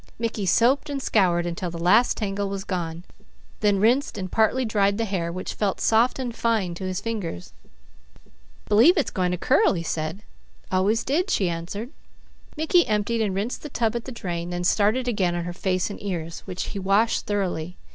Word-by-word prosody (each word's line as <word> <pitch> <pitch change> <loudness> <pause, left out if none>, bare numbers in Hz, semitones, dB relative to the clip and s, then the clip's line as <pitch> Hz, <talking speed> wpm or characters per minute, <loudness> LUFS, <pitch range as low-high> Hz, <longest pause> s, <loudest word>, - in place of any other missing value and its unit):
Mickey 225 -4 -2
soaped 260 - +3
and 280 -1 -2
scoured 180 -9 +2
until 175 +1 -3
the 170 - -7
last 190 +8 +4
tangle 200 -2 -2
was 195 -1 -4
gone, 175 -4 -4 0.6
then 205 -2 +3
rinsed 240 +4 +2
and 185 -2 -5
partly 225 +4 +2
dried 200 -2 +2
the 230 - 0
hair, 180 -5 -2
which 185 +2 -5
felt 200 -3 -1
soft 230 +3 +3
and 245 -3 -4
fine 220 -8 0
to 180 +2 -6
his 185 0 -2
fingers. 200 - -5 1.1
"B'lieve 270 - +6
it's 300 - +1
going 180 -2 0
to 180 - -1
curl," - - +3
he 170 -3 -3
said. 160 +5 -3 0.5
"Always 195 +4 +2
did," 350 +8 0
she 190 - +1
answered. 180 +9 -5 0.7
Mickey 330 +3 +3
emptied 215 +2 0
and 200 -3 0
rinsed 210 +6 -2
the 300 - -7
tub 230 -3 0
at 235 - -3
the 265 - -6
drain, 175 -7 -4
then 175 0 -3
started 215 +7 +2
again 190 -7 +1
on 175 - -2
her 175 0 -5
face 185 +1 -1
and - - -8
ears, 170 -4 -4
which 185 -1 -4
he 200 - -5
washed 200 +4 +1
thoroughly. 180 -4 -2
200 Hz, 190 wpm, -24 LUFS, 180-230 Hz, 1.1 s, B'lieve